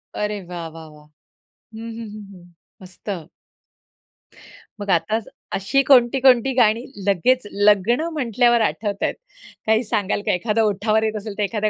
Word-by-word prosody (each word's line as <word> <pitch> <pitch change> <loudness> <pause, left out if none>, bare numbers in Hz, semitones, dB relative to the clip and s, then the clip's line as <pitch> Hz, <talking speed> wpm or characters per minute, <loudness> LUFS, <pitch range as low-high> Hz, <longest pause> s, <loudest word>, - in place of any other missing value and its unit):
अरे 210 -1 -2
वाह, 175 -1 -6
वाह, 160 0 -11
वाह! 150 0 -17 0.7
हं, 225 +1 -7
हं, 230 - -7
हं, 215 - -9
हं 175 -1 -17 0.3
मस्त. 180 -2 -8 1.5
मग 200 - -6
आता 205 +5 +1 0.4
अशी 195 +9 +1
कोणती, 260 -1 +4
कोणती 260 0 +4
गाणी 230 +2 +3 0.2
लगेच 210 +5 +2
लग्न 205 +5 +3
म्हटल्यावर 240 -3 +2
आठवतायेत. 205 +2 -1 0.5
काही 220 +2 +2
सांगाल 210 -3 -1
का? - - +2
एखादं 210 +5 0
ओठावर 215 +1 +1
येत 220 0 -1
असेल, 205 -1 -7
तर 210 - 0
एखादं 210 +1 -1
210 Hz, 145 wpm, -21 LUFS, 195-235 Hz, 1.5 s, कोणती